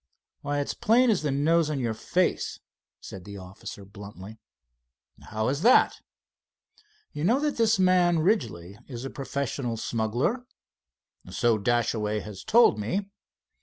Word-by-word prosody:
"Why, 145 0 -2
it's 140 - -3
plain 240 +2 +3
as 205 - +1
the 150 - -1
nose 155 +3 +2
on 150 -3 -2
your 115 -3 -1
face," 110 - -1 0.4
said 95 - -10
the 100 +2 -9
officer 95 +1 -10
bluntly. 100 +1 -11 0.9
"How 110 0 -2
is 140 +3 -2
that?" 245 +6 +5 1.2
"You 150 - -4
know 230 +10 +3
that 300 0 -1
this 225 -2 +3
man, 180 -2 +4
Ridgely, 110 - -1
is 125 -2 -7
a 135 - -5
professional 135 -3 -3
smuggler?" 120 - -1 0.8
"So 120 -3 +1
Dashaway 110 -1 0
has 105 -3 -9
told 230 - +4
me." 195 - -3
135 Hz, 135 wpm, -26 LUFS, -, 1.2 s, that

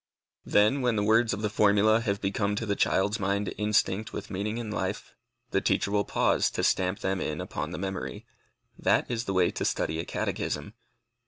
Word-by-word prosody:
Then, 105 +7 +3
when 125 -2 +1
the 105 - +1
words 115 +2 +3
of 105 +1 -3
the 105 - +1
formula 105 +1 +4
have 100 -3 -1
become 100 +1 -1
to 115 - -2
the 100 -2 0
child's 100 +3 +1
mind 100 0 -1
instinct 105 -1 +1
with - - -7
meaning 105 +3 -2
and 110 -3 -4
life, - - -3 0.4
the - - +1
teacher 100 - +1
will 100 -1 +1
pause - - +2
to - - 0
stamp 95 +1 +1
them 95 -1 -1
in 75 0 -3
upon - - -4
the - - -6
memory. 95 +1 -5 0.5
That - - +2
is 120 -1 -2
the 95 - -2
way 90 -2 +3
to - - -4
study 80 +1 -1
a 85 - -3
catechism. 75 +8 -3
105 Hz, 195 wpm, -28 LUFS, 95-110 Hz, 0.5 s, formula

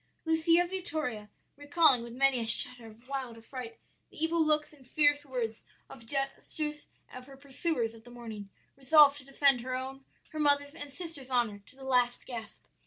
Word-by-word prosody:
"Lucia 325 +2 +3
Vittoria, 310 - -4 0.3
recalling, 290 -3 +4
with 235 0 -8
many 265 +1 +2
a 225 - -3
shudder 245 +1 +4
of 225 +3 -16
wild 265 -4 -5
affright, 230 0 -8 0.3
the - - -14
evil 325 0 +2
looks 305 0 +1
and 270 -4 -19
fierce 290 +1 +3
words 230 -4 -3 0.3
and 230 -4 -13
gestures 295 +3 -4 0.3
of 255 +1 -10
her 270 -1 -13
pursuers 270 -3 -2
of 225 -1 -15
the 245 - -14
morning, 225 -4 -9 0.3
resolved 285 +1 +6
to - - -12
defend 275 -1 +2
her 255 +1 -3
own, 265 +1 -5 0.3
her 310 - -7
mother's, 285 -1 +2
and 290 -3 -8
sister's 310 -5 -7
honor 235 -5 0
to - - -16
the 270 - -13
last 250 -2 +1
gasp. 225 -4 -8
270 Hz, 175 wpm, -30 LUFS, 240-295 Hz, 0.3 s, resolved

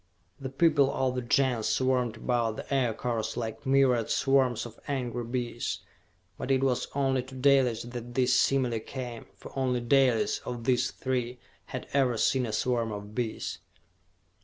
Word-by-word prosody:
The 135 -1 -5
people 140 -1 +3
of 130 -2 0
the 125 - -2
Gens 125 -2 +1
swarmed 125 -3 +1
about 115 -2 0
the - - -6
Aircars 120 -3 -1
like 115 +4 -5
myriad 130 -4 +3
swarms 130 -4 +2
of 115 -1 -11
angry 125 -4 -2
bees, 120 0 -3 0.6
but - - -4
it 135 0 +3
was 130 -2 +1
only 135 -2 +1
to 130 +1 -12
Dalis 130 -3 +3
that 120 0 -8
this 130 -1 +3
simile 130 -3 +2
came, 120 0 -7
for - - -12
only 130 -2 +1
Dalis, 125 -1 +3
of 120 -2 -6
these 125 +1 +2
three, 125 -2 -3 0.3
had - - -6
ever 130 -4 +2
seen 125 +3 +2
a - - -3
swarm 115 -1 0
of 105 0 -7
bees. 115 -1 -3
125 Hz, 160 wpm, -28 LUFS, 120-135 Hz, 0.6 s, people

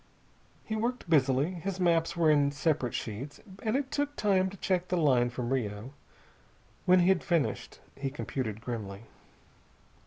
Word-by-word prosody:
He 220 - -3
worked 235 +1 -2
busily. 140 +1 +3
His 185 +2 -4
maps 170 -2 +2
were 160 -2 +5
in 145 -1 +3
separate 145 -4 0
sheets, 120 +7 -5 0.2
and 220 +2 0
it 270 -1 -1
took 290 0 -1
time 190 -2 +2
to 200 - -11
check 180 -1 0
the 180 - 0
line 130 -7 +3
from 120 +1 -3
Rio. 110 0 -3 0.9
When 180 0 +6
he 175 - +4
had 190 -2 +3
finished, 170 -4 -1 0.2
he 135 0 -3
computed 125 -6 -4
grimly. 110 -4 -5
155 Hz, 155 wpm, -30 LUFS, 125-185 Hz, 0.9 s, When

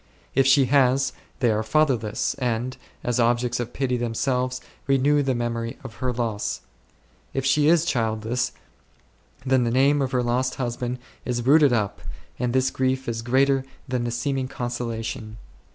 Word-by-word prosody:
If 135 0 +3
she 135 0 +6
has, 135 0 +3 0.3
they 120 -3 +4
are 110 0 +1
fatherless, 115 -3 +1
and, 125 0 -1 0.3
as 120 0 0
objects 120 +1 +2
of 120 0 -3
pity 130 -2 -1
themselves, 125 +2 -1 0.3
renew 140 +2 +3
the 135 -2 0
memory 115 -1 -3
of 125 -4 -8
her 125 +3 -1
loss. 115 -4 -2 0.7
If 135 -1 -1
she 145 +2 +3
is 165 0 +4
childless, 115 -2 0 0.9
then 130 -1 +3
the 120 - +1
name 140 +4 +3
of 130 -2 -1
her 125 -1 +1
lost 125 +2 0
husband 120 0 -3 0.3
is 120 -1 -2
rooted 145 0 +6
up, 105 -4 0 0.4
and 125 -1 0
this 130 +1 +2
grief 130 0 -1
is 115 -1 -2
greater 135 +3 +2 0.2
than 125 -1 -1
the 120 - -1
seeming 130 +3 -1
consola 120 -2 -4
tion. 110 -3 -6
125 Hz, 160 wpm, -24 LUFS, 120-135 Hz, 0.9 s, she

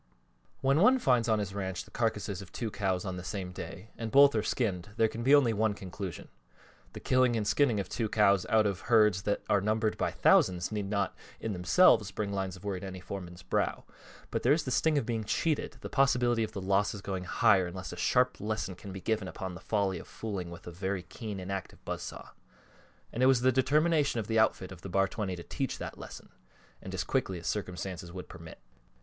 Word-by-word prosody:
WHEN 135 +3 +3
one 250 +8 +6
finds 125 - +2
on 110 - +3
his 100 -2 -3
ranch 95 -2 -3
the - - -19
carcasses 105 -4 -1
of 95 - -12
two 115 -3 -4
cows 95 -1 -1
on 95 -1 -4
the 90 - -6
same 95 -1 -4
day, 95 +3 -8
and 115 -1 -4
both 140 +3 +7
are 110 - +1
skinned, 105 -5 -1
there 115 - +4
can 115 +1 -6
be 135 +4 +6
only 130 -6 +4
one 110 -1 +1
conclusion. 95 -3 -7 0.7
The - - -7
killing 130 -2 +3
and 105 -2 -1
skinning 115 0 +3
of 95 - -3
two 110 +1 -2
cows 100 -3 +3
out 110 -2 +4
of 100 -3 -1
herds 105 -5 +4
that 100 - 0
are 100 - +3
numbered 110 +1 0
by - - +1
thousands 90 0 +3
need 105 -2 -3
not, 100 -2 -1 0.2
in 110 - -3
themselves, 105 - +4
bring 100 -1 -3
lines 95 -1 -2
of 90 - -14
worry 100 -3 -3
to 95 - -7
any 95 -1 -7
foreman's 90 -4 -8
brow; - - -1 0.5
but - - -1
there - - +4
is 155 0 +1
the 130 - -4
sting 155 +4 +2
of 140 - 0
being 115 -2 -2
cheated, 155 +8 -1
the - - -5
possibility 125 -4 +2
of 110 - -5
the 100 - -4
losses 100 +1 +1
going 95 -2 -4
higher 90 +1 +3
unless 95 +1 -7
a - - -6
sharp 125 0 +2
lesson 105 -2 -2 0.2
be 95 0 -7
given 110 -2 -1
upon 95 0 -6
the 85 - -10
folly 100 -4 0
of - - -11
fooling 100 -6 -5
with 85 - -11
a 90 - -7
very 95 +1 -3
keen 105 -1 -7
and 95 +1 -6
active 95 -1 -6
buzz - - -3
saw, - - -8 0.8
and 120 - -2
it 130 - +6
was 130 -3 +4
the 130 +1 +4
determination 145 +1 +2
of 110 - -3
the 110 +1 +1
outfit 95 -4 +1
of 90 -2 -10
the 95 - -7
Bar 95 +2 +2
20 95 -2 -3
to 85 - -8
teach 135 - -3
that - - -7
lesson, - - -10 0.5
and - - -8
as - - -1
quickly 95 - -1
as 85 - -10
circumstances 90 -3 -4
would 90 0 -8
permit. 80 0 -11
105 Hz, 225 wpm, -30 LUFS, 95-115 Hz, 0.8 s, both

